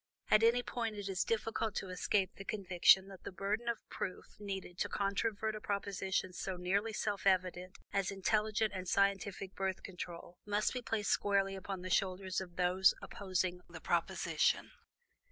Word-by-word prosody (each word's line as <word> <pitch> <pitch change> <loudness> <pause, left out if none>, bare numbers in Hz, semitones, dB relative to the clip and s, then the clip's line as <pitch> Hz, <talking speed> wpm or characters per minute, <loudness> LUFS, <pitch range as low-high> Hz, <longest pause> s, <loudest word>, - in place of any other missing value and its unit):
At 215 - +7
any 235 +2 +4
rate, 230 -3 -1
it 205 -1 -5
is 190 -1 +1
difficult 225 -1 -1
to 190 - -3
escape 190 +1 +1
the 195 - -9
conviction 190 -1 +4
that 190 -2 -11
the - - -6
burden 210 +5 -1
of 235 - -3
proof 185 - -4
needed 195 -3 -5
to - - 0
controvert 210 +2 0
a 215 - -6
proposition 195 -2 -1
so 185 +1 -4
nearly 200 +5 0
self 205 -2 -1
evident 185 -1 +1 0.2
as 195 -2 +1
intelligent 215 +1 +1
and 185 -1 -5
scientific 200 -1 +1
Birth 190 -1 -2
Control, 175 -1 -8
must 205 +1 +1
be 250 - -3
placed 225 -3 -1
squarely 195 -1 +2
upon 190 -1 -5
the 185 - -4
shoulders 185 0 +1
of 175 -2 -9
those 180 +1 +4
opposing 185 -2 -2
the - - -9
proposition. - - +1
195 Hz, 165 wpm, -35 LUFS, 185-210 Hz, 0.2 s, At